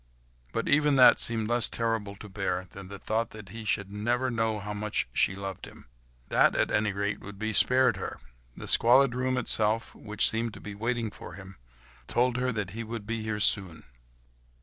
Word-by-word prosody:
But - - -3
even 145 0 +3
that 125 -2 +7
seemed 115 -2 +2
less 120 0 +3
terrible 115 -3 -2
to 105 - -11
bear 95 -2 -3
than 100 -1 -10
the 100 +1 -8
thought 110 +4 -2
that 105 -3 -11
he 110 +3 -8
should 100 -2 -1
never 120 +5 -1
know 115 -2 0
how 105 +1 -5
much 105 - -2
she 95 - +1
loved 95 -1 -6
him—that - - -2
at - - +1
any 105 0 +1
rate 100 +1 -2
would 100 0 -10
be 110 +1 -3
spared 130 +4 +4
her; - - -6 0.4
the - - -7
squalid 125 +2 +5
room 130 +1 -1
itself, 110 0 +1
which 105 0 +1
seemed 115 0 -1
to - - -10
be 105 - -8
waiting 115 +1 -2
for 90 - -10
him, 95 0 -11 0.5
told 125 0 +1
her 125 0 0
that 105 -6 -3
he 115 +4 -5
would 115 -1 -6
be 115 +1 -3
here 110 -1 -3
soon. 95 -6 +1
110 Hz, 195 wpm, -28 LUFS, 100-115 Hz, 0.5 s, that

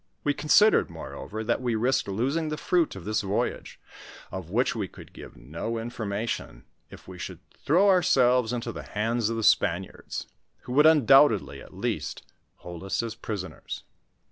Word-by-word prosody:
We 145 - +2
considered, 205 +10 +4
moreover, 110 +1 -7
that 120 +3 0
we 120 -2 0
risked 120 +4 +1
losing 135 +11 -1
the 155 - -3
fruit 175 - +1
of 95 -3 -9
this 110 +1 0
voyage, 100 0 -3 0.5
of 95 -3 -6
which 120 +7 +1
we 105 -4 -2
could - - -14
give - - -12
no 85 - -5
information, 110 - -4 0.3
if - - -14
we - - -10
should - - -6 0.3
throw 180 +7 +4
ourselves 125 - +4
into 120 -1 -3
the - - -7
hands 110 +1 -1
of 115 - -2
the 115 - -2
Spaniards, - - +1 0.4
who 125 - -7
would 150 +3 +6
undoubtedly, 135 -6 +5
at - - -14
least, - - -3 0.3
hold 85 0 -9
us 95 +4 -1
as 115 -1 -4
prisoners. 105 -5 -6
115 Hz, 165 wpm, -27 LUFS, 105-135 Hz, 0.5 s, would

